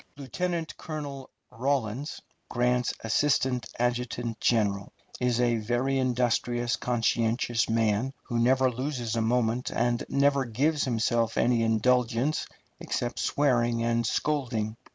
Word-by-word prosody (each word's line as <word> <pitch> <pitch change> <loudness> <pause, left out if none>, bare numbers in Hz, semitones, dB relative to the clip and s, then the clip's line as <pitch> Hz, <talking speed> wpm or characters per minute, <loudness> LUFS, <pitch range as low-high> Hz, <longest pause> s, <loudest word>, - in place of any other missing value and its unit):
Lieutenant 165 +5 -3
Colonel 145 -4 -6 0.2
Rawlins, 130 +2 -2 0.3
Grant's 125 0 +1
assistant 125 0 +1
adjutant 120 -1 -2
general, 100 -4 +1 0.3
is 125 -1 +1
a 120 -1 +2
very 120 +5 0
industrious, 120 -1 0
conscientious 115 -1 0
man, 115 +2 +1
who 120 - -2
never 130 +2 +3
loses 125 -2 -3
a 115 - +1
moment, 120 +1 +1
and 120 0 0
never 140 0 +3
gives 145 +6 0
himself 115 -1 0
any 120 -1 +3
indulgence 120 +5 +1 0.3
except 120 0 -3
swearing 120 -5 +1
and 115 0 +1
scolding. 115 -7 -1
120 Hz, 110 wpm, -27 LUFS, 115-130 Hz, 0.3 s, never